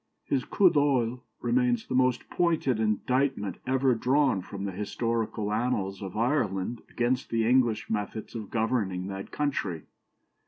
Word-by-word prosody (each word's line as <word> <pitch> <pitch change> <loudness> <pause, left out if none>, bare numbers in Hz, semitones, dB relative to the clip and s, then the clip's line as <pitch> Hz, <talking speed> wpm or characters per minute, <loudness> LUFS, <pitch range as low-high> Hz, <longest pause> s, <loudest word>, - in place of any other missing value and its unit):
His 135 -3 0
coup 190 -3 +4
d'oeil 130 -5 +2 0.2
remains 245 -2 +1
the - - -5
most 125 -1 +2
pointed 160 -9 +1
indictment 110 0 0
ever 130 0 +3
drawn 130 -2 +2
from 100 +2 -6
the 100 - -2
historical 105 +1 -2
annals 105 -4 -1
of 95 0 -6
Ireland 115 -4 0
against 125 +2 0
the 115 -1 +1
English 120 -4 +3
methods 105 0 -3
of 110 -4 -6
governing 110 -5 0
that 95 0 -6
country. 100 - -2
115 Hz, 135 wpm, -28 LUFS, 105-130 Hz, 0.2 s, coup